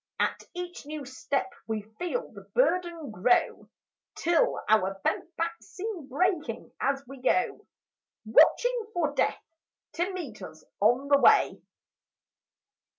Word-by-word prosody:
At - - 0
each 355 -4 -6
new 300 -2 -5
step 260 0 -2
we 220 -2 -2 0.2
feel 360 +8 -2
the - - -12
burden 345 - +1
grow, 215 +5 +1 0.5
Till 340 -1 +2
our 195 -3 +2
bent 340 - -1
backs 335 +1 -3
seem 375 -7 -6
breaking 315 - -1
as 275 0 0
we 270 0 -11
go, 245 -1 +1 0.6
Watching 470 - +4
for 310 -5 +1
Death - - 0 0.5
to 350 +3 -1
meet 305 - -7
us 160 -4 -10 0.2
on 245 +7 +3
the 280 -1 +5
way. - - +5
290 Hz, 125 wpm, -28 LUFS, 245-355 Hz, 0.6 s, the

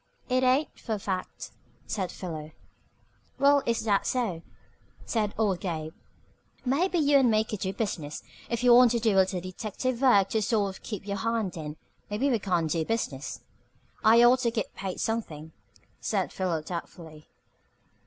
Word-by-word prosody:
"It 255 0 +2
ain't, 260 +4 +1
for 225 - -3
a - - -5
fact," 190 -2 -4 0.3
said 190 -4 -3
Philo. 155 -4 -7 0.8
"Well, 280 +1 +5
if 230 -1 +1
that's 205 -3 +1
so," 220 -10 -1 0.6
said 215 -3 0
old 200 -5 +1
Gabe, 160 -3 -4 0.7
"maybe 340 +8 +1
you 290 -3 +5
and 255 -3 +4
me 215 -1 +3
could 215 -2 -6
do 190 - -2
business. 180 -8 -4 0.3
If 235 0 -2
you 245 -1 +7
want 245 0 +8
to 235 - +1
do 225 -2 +2
a - - +2
little 190 -1 -1
detective 220 +7 -4
work 205 -8 +5
to 220 - 0
sort 205 -3 0
of - - -14
keep 210 -3 -6
your 200 0 -2
hand 225 -2 -1
in, 155 -2 -6 0.3
maybe 240 +7 0
we 235 - +2
can 180 -4 0
do 160 +1 0
business." 155 -9 -3 0.6
"I 230 +2 +7
ought 245 +2 +6
to 245 -2 +1
git 225 -3 -3
paid 190 -1 -5
something," 160 -9 -3 0.5
said - - -1
Philo 175 -5 -1
doubtfully. 160 -2 -8
210 Hz, 170 wpm, -28 LUFS, 180-235 Hz, 0.8 s, want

